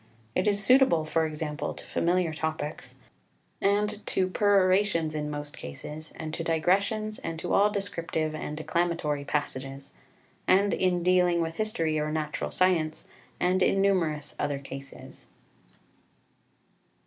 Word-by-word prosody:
It 185 - +1
is 205 0 +2
suitable, 250 - +5
for 160 +1 +1
example, 150 -1 -4
to - - -11
familiar 175 -1 +1
topics, 155 -1 -4 0.7
and 210 +1 +1
to 185 - +2
perorations 190 -4 +3
in 150 -1 -2
most 145 0 -5
cases, 150 - -8
and 155 -1 -6
to 165 - -3
digressions, 200 +6 +1
and 165 - -5
to - - -3
all 205 +1 +5
descriptive 170 -6 -2
and 150 -1 -5
declamatory 155 -3 -1
passages, 135 -2 -3 0.6
and 200 +2 +4
in 180 -2 +1
dealing 180 -1 +4
with 165 0 -2
history 165 -8 0
or 150 0 -1
natural 155 -1 -2
science, 165 -4 +1 0.3
and 185 +1 +2
in 195 - +3
numerous 170 -7 +1
other 145 -1 0
cases. 135 0 -10
165 Hz, 130 wpm, -28 LUFS, 155-190 Hz, 0.7 s, suitable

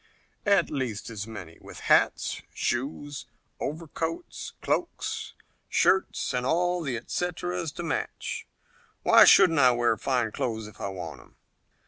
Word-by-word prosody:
"At 200 -1 +4
least 125 -7 -3
as 105 -1 -5
many, 95 -7 -9
with - - -11
hats, - - +2
shoes, 140 +2 -3 0.3
overcoats, 165 - -4
cloaks, - - -2 0.4
shirts 190 -6 +2
and 125 0 0
all 175 +6 +1
the 135 -7 -2
et 115 - -10
ceteras 175 -1 -2
to 175 - -5
match. 475 - -3 0.6
Why - - +8
shouldn't 175 -6 +7
I 130 -2 +7
wear 120 -1 +2
fine 125 -5 0
clothes 110 -1 -2
if 105 - -12
I - - -2
want 90 -3 -6
'em? - - -22
140 Hz, 135 wpm, -27 LUFS, 115-175 Hz, 0.6 s, Why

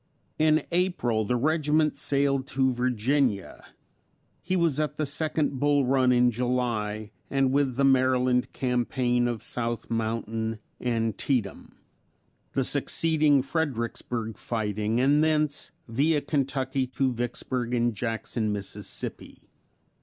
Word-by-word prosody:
In 155 -1 +4
April 170 - +1
the 125 - 0
regiment 150 +2 +2
sailed 140 -1 +1
to 130 0 +1
Virginia; 125 -2 0 0.8
he 185 +2 -1
was 165 -5 +2
at 150 -1 -1
the 155 - 0
second 145 -1 0
Bull 145 -1 +3
Run 130 0 +3
in 125 0 +4
July, 115 -3 -2 0.2
and 135 -1 +2
with 135 -2 +1
the 140 - +1
Maryland 130 -2 +3
campaign 125 -1 0
of 120 -2 -3
South 115 -1 -4
Mountain, 115 0 -2 0.3
Antietam; 115 -1 -1 0.8
the - - +1
succeeding 155 -4 +2
Fredericksburg 120 - -3
fighting 110 0 -1
and 145 +4 +4
thence 155 -2 +1 0.2
via 145 +7 +2
Kentucky 135 -2 -1
to 130 0 0
Vicksburg 120 +1 -2
and 120 0 +1
Jackson, 115 0 -2
Mississippi. 100 -1 -5
125 Hz, 115 wpm, -27 LUFS, 115-145 Hz, 0.8 s, In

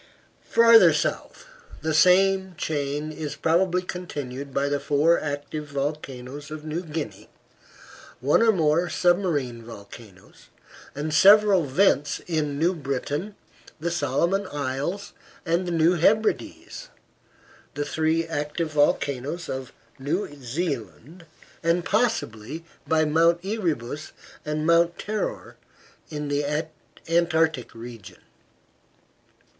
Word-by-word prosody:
Farther 230 -1 +7
south, - - -3 0.4
the 160 0 0
same 190 +3 +4
chain 145 0 -2
is 155 -1 -5
probably 180 +2 +1
continued 145 -7 -6
by 140 +1 0
the 145 0 0
four 150 +5 +3
active 150 +1 -5
volcanoes 140 -1 -5
of 155 0 -8
New 155 +3 -3
Guinea, 150 - -6 0.9
one 135 - +3
or 230 -1 +6
more 170 -2 +2
submarine 170 -10 +1
volcanoes, 105 -3 -13 0.5
and 150 +2 -3
several 200 +1 +6
vents 145 0 +2
in 150 -4 -1
New 170 +5 +2
Britain, 145 +6 -4 0.4
the 170 +2 -2
Solomon 170 +6 0
Isles, 145 +7 -4 0.3
and 175 +2 0
the - - -2
New 165 +1 +3
Hebrides, 220 - 0 0.9
the 145 +1 -2
three 160 +2 0
active 155 0 -3
volcanoes 145 +2 0
of 130 -1 -5 0.3
New 145 +4 -2
Zealand, 140 - -5 0.4
and 170 +1 +1
possibly 165 - -1 0.2
by 155 0 +3
Mount 165 +3 +3
Erebus 155 - -3 0.3
and 150 0 -2
Mount 170 +1 +3
Terror 215 0 -4 0.5
in 150 -1 -4
the 145 0 0 0.6
Antarctic 160 -6 +1
region. 115 -2 -10
155 Hz, 105 wpm, -25 LUFS, 140-175 Hz, 0.9 s, Farther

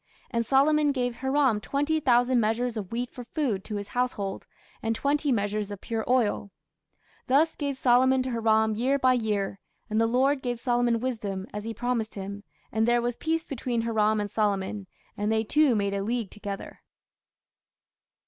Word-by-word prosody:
And 235 -2 +1
Solomon 290 +4 +3
gave 245 -3 -2
Hiram 265 -5 +2
twenty 290 +6 0
thousand 245 -2 +3
measures 230 +2 0
of 205 -4 -5
wheat 245 +1 -3
for 245 - -7
food 240 -6 -2
to 215 - -4
his 205 0 -5
household, 230 -6 -2 0.3
and 225 0 -1
twenty 285 +3 +1
measures 205 -2 -1
of 205 -1 -6
pure 225 -1 -3
oil: 235 -5 +1 0.8
thus 300 +5 +3
gave 280 -2 -3
Solomon 260 +1 +4
to 255 - -3
Hiram 220 -1 +2
year 255 +6 +1
by 255 -2 +4
year. 210 -5 -1 0.3
And 215 +1 +2
the 225 - +3
Lord 265 +4 +2
gave 245 -2 -3
Solomon 240 -2 +1
wisdom, 210 -7 -3
as 210 +1 -5
he 230 - -3
promised 235 -1 -2
him: 200 +1 -6 0.3
and 220 +1 +1
there 240 0 +4
was 240 0 -1
peace 325 +4 -1
between 245 -3 -2
Hiram 215 -2 +2
and 205 -1 -3
Solomon; 200 -1 -1 0.3
and 210 +1 -1
they 220 0 +2
two 290 +2 +3
made 200 -1 0
a 200 - -1
league 225 0 -2
together. 200 -1 -7
235 Hz, 175 wpm, -27 LUFS, 210-260 Hz, 0.8 s, Solomon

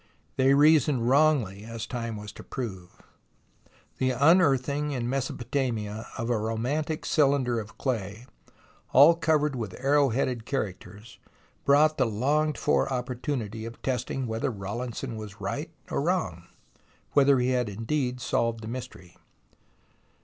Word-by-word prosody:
They 135 +1 +4
reasoned 145 -4 +4
wrongly, 130 -8 +3
as 115 0 -6
time 115 -1 -4
was 105 0 -8
to - - -12
prove. 95 -9 -7 1.0
The 130 - +2
unearthing 145 0 +3
in 120 -3 -2
Mesopotamia 120 -4 -2
of 115 +1 -2
a 115 - +1
romantic 125 +9 -2
cylinder 135 -5 +2
of 110 0 -9
clay, 110 -3 -3 0.7
all 145 +5 +8
covered 155 -4 +1
with 110 -6 -5
arrow 140 +1 +3
headed 125 -1 -1
characters, 105 -3 -5 0.5
brought 150 +2 +4
the 130 - +3
longed 145 +8 0
for - - +1
opportunity 125 -3 -3
of 115 +1 -8
testing 130 0 -2
whether 110 -1 -2
Rawlinson 115 +3 -5
was 105 -2 -9
right - - -4 0.2
or - - 0
wrong, - - -1 0.6
whether 140 -1 +5
he 125 0 +1
had 125 -3 +1
indeed 125 +4 -2
solved 115 -2 -1
the - - -6
mystery. 115 -7 -8
125 Hz, 130 wpm, -27 LUFS, 110-140 Hz, 1.0 s, all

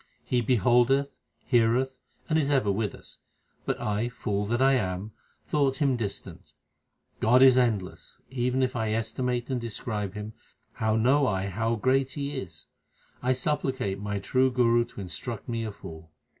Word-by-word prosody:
He 125 -1 0
beholdeth, 125 +4 +3 0.3
heareth, 125 +2 +2 0.3
and 160 -1 +2
is 145 -2 0
ever 130 -8 +2
with 105 +1 -2
us; - - -16 0.5
but - - -1
I, 105 +3 -1
fool 105 -3 -2
that 120 +2 0
I 135 +1 +5
am, 100 -3 -1 0.3
thought 140 -3 +1
Him 135 -1 +1
distant. 105 -5 -6 0.7
God 125 +4 +5
is 130 -2 +8
endless; 110 -7 -1
even 125 0 0
if 130 0 -1
I 110 -2 0
estimate 120 +3 -2
and 125 -2 -1
describe 105 -3 -4
Him, 105 +1 -6 0.4
how 110 0 0
know 130 +5 +3
I 95 -3 -1
how 115 +4 0
great 130 +4 +1
He 145 0 -3
is? 85 - -7 0.6
I 130 +1 +2
supplicate 130 -6 -1
my 105 0 -3
true 130 +6 +2
Guru 120 -2 +3
to 115 - -10
instruct 105 +4 -6
me 115 -1 -2
a 110 - -3
fool. 80 -5 -11
120 Hz, 160 wpm, -27 LUFS, 105-130 Hz, 0.7 s, is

